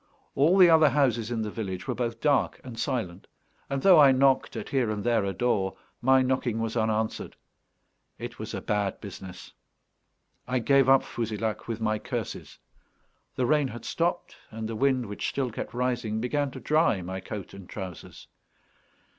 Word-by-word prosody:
All 160 Hz, +7 st, +4 dB
the 185 Hz, -2 st, +8 dB
other 160 Hz, -2 st, +6 dB
houses 120 Hz, -5 st, +1 dB
in 115 Hz, -2 st, -2 dB
the 105 Hz, -, -4 dB
village 95 Hz, -5 st, -5 dB
were -, -, 0 dB
both 115 Hz, -2 st, -3 dB
dark 145 Hz, -3 st, +2 dB
and 120 Hz, -3 st, -9 dB
silent; 95 Hz, -8 st, -3 dB, 0.4 s
and 140 Hz, -1 st, -2 dB
though 185 Hz, -4 st, +8 dB
I 140 Hz, -2 st, +8 dB
knocked 135 Hz, 0 st, +2 dB
at -, -, -5 dB
here 130 Hz, -5 st, +1 dB
and 105 Hz, -1 st, -3 dB
there 115 Hz, -3 st, +2 dB
a 100 Hz, -, -1 dB
door, 95 Hz, -4 st, 0 dB, 0.2 s
my 130 Hz, +1 st, +5 dB
knocking 125 Hz, -3 st, 0 dB
was 115 Hz, 0 st, -2 dB
unanswered. 110 Hz, -1 st, -1 dB, 0.8 s
It -, -, -8 dB
was -, -, -5 dB
a -, -, -4 dB
bad 105 Hz, -2 st, -1 dB
business; 95 Hz, -3 st, -10 dB, 0.9 s
I 130 Hz, 0 st, 0 dB
gave 135 Hz, +2 st, +3 dB
up 135 Hz, 0 st, +6 dB
Fouzilhac 110 Hz, -1 st, -3 dB
with 115 Hz, -1 st, -3 dB
my 110 Hz, -1 st, 0 dB
curses. -, -, -5 dB, 0.8 s
The 125 Hz, -, 0 dB
rain 145 Hz, +2 st, +2 dB
had 120 Hz, -2 st, -9 dB
stopped, 175 Hz, +1 st, -2 dB
and 110 Hz, 0 st, -5 dB
the 115 Hz, -, -5 dB
wind, 130 Hz, 0 st, +1 dB
which 105 Hz, -1 st, -3 dB
still 130 Hz, -3 st, -2 dB
kept -, -, -6 dB
rising, 120 Hz, -3 st, -1 dB
began 140 Hz, +4 st, -1 dB
to -, -, -9 dB
dry 155 Hz, -, +2 dB
my 95 Hz, +2 st, -5 dB
coat 100 Hz, 0 st, -7 dB
and 95 Hz, -2 st, -11 dB
trousers. 90 Hz, -3 st, -8 dB
120 Hz, 175 wpm, -27 LUFS, 105-135 Hz, 0.9 s, the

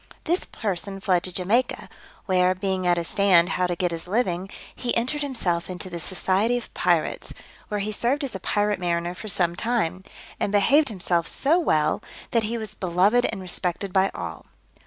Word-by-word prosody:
This 350 Hz, +3 st, 0 dB
person 195 Hz, -1 st, -4 dB
fled 185 Hz, -3 st, +2 dB
to 185 Hz, -, -4 dB
Jamaica, 210 Hz, +8 st, 0 dB, 0.4 s
where, 185 Hz, -1 st, +3 dB
being 185 Hz, -1 st, -1 dB
at 175 Hz, 0 st, +3 dB
a 170 Hz, -, 0 dB
stand 180 Hz, -1 st, +4 dB
how 180 Hz, -2 st, +1 dB
to 175 Hz, -, -2 dB
get 180 Hz, -1 st, 0 dB
his 165 Hz, +1 st, -5 dB
living, 190 Hz, -3 st, 0 dB, 0.3 s
he 245 Hz, -, 0 dB
entered 260 Hz, +6 st, 0 dB
himself 195 Hz, -13 st, -1 dB
into 185 Hz, 0 st, -6 dB
the 170 Hz, -, -4 dB
society 195 Hz, +7 st, +1 dB
of 240 Hz, -, -8 dB
pirates, -, -, 0 dB, 0.3 s
where 210 Hz, -1 st, -2 dB
he 210 Hz, +2 st, -2 dB
served 245 Hz, +7 st, 0 dB
as 270 Hz, -, -3 dB
a 190 Hz, -, -4 dB
private 205 Hz, +1 st, 0 dB
mariner 175 Hz, -1 st, -1 dB
for 215 Hz, -, -9 dB
some 175 Hz, -3 st, +1 dB
time, 190 Hz, -4 st, -1 dB, 0.4 s
and 200 Hz, -, 0 dB
behaved 275 Hz, +9 st, +4 dB
himself 175 Hz, -5 st, 0 dB
so 310 Hz, -, +3 dB
well, 155 Hz, -, +1 dB, 0.3 s
that 230 Hz, -, +3 dB
he 230 Hz, +2 st, -2 dB
was 220 Hz, -2 st, -5 dB
beloved 190 Hz, +7 st, +2 dB
and 205 Hz, -4 st, -6 dB
respected 180 Hz, +1 st, -2 dB
by 190 Hz, 0 st, +4 dB
all. 85 Hz, -2 st, -6 dB
190 Hz, 185 wpm, -24 LUFS, 175-225 Hz, 0.4 s, stand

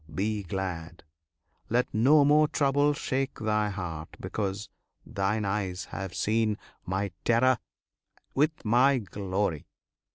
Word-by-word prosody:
Be 105 Hz, +2 st, 0 dB
glad! 85 Hz, -3 st, -5 dB, 0.7 s
Let 125 Hz, +3 st, +1 dB
no 140 Hz, +7 st, +5 dB
more 150 Hz, +1 st, +5 dB
trouble 145 Hz, 0 st, +2 dB
shake 135 Hz, 0 st, -2 dB
thy 105 Hz, -1 st, +1 dB
heart, 85 Hz, -5 st, -5 dB
because 100 Hz, 0 st, -3 dB, 0.4 s
thine 105 Hz, +2 st, -1 dB
eyes 95 Hz, -2 st, -2 dB
have 95 Hz, -2 st, -5 dB
seen 110 Hz, -1 st, +1 dB, 0.3 s
My 95 Hz, +1 st, -1 dB
terror 120 Hz, +2 st, +3 dB, 0.7 s
with 150 Hz, +1 st, +1 dB
My 130 Hz, +5 st, +4 dB
glory. 95 Hz, -, -2 dB
105 Hz, 110 wpm, -28 LUFS, 95-130 Hz, 0.7 s, no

